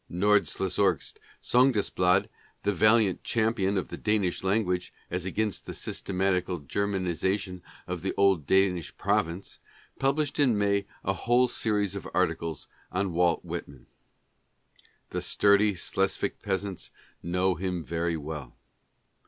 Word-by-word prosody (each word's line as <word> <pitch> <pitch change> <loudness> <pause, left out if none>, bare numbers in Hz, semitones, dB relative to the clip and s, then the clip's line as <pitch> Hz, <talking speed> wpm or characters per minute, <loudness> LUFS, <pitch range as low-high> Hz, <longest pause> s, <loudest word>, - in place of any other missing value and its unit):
" - - -23
Nordslesorgsk 95 -2 +1 0.3
Sondagsblad," 105 -7 +3 0.4
the 100 - +1
valiant 105 0 +3
cham 115 -1 +1
pion 100 -3 0
of 95 - -2
the - - -6
Danish 105 -5 0
language 95 -2 0 0.2
as 90 0 -2
against 105 +1 -2
the - - -6
systematical 90 -1 -1
German 95 +6 -2
isation 90 +2 -1 0.2
of 90 -1 -5
an 95 - 0
old 95 -7 +3
Danish 95 -4 +2
province, 85 +4 -1 0.4
published 140 +2 0
in 125 -7 +4
May 100 -1 +1 0.2
a 95 - +1
whole 120 +5 +2
series 105 -4 0
of 100 - -6
articles 80 -3 -1 0.2
on 95 0 -1
Walt 85 0 +2
Whitman. 80 -6 -7 1.3
The - - -2
sturdy 100 0 +3
Slesvic 95 +2 -1
peasants 95 -2 -3 0.3
know 90 +2 +1
him 90 -1 -3
very 85 +1 -1
well. 75 -4 -7
95 Hz, 130 wpm, -28 LUFS, 90-105 Hz, 1.3 s, in